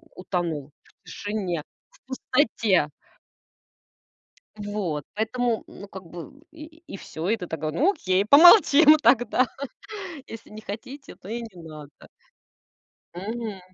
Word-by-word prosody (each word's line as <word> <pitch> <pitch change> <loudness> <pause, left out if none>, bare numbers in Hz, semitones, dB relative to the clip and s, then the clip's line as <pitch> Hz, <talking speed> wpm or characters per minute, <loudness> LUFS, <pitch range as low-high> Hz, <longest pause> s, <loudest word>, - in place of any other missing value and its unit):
утонул 170 -6 -3
в - - -29
тишине, 200 -6 -4 0.3
в - - -24
пустоте. 230 - +1 1.7
Вот. 205 -8 -3
Поэтому, 230 +2 -1
ну, 200 - -12
как 190 -1 -10
бы 170 0 -9 0.2
и 315 +1 -13
и - - -7
всё. 165 -1 -6
И 225 - +2
ты 180 - -7
такая: 155 -1 -4
ну, 310 - +3
окей, 190 - 0
помолчим 310 - +8
тогда. 245 +1 +4 0.8
Если 225 0 -10
не 215 +1 -9
хотите, 250 +7 -9
то 190 - -14
и 235 +2 -3
не 185 -7 -11
надо. 155 -3 -10 1.2
Мгм. 210 +1 -5
210 Hz, 120 wpm, -25 LUFS, 175-250 Hz, 1.7 s, помолчим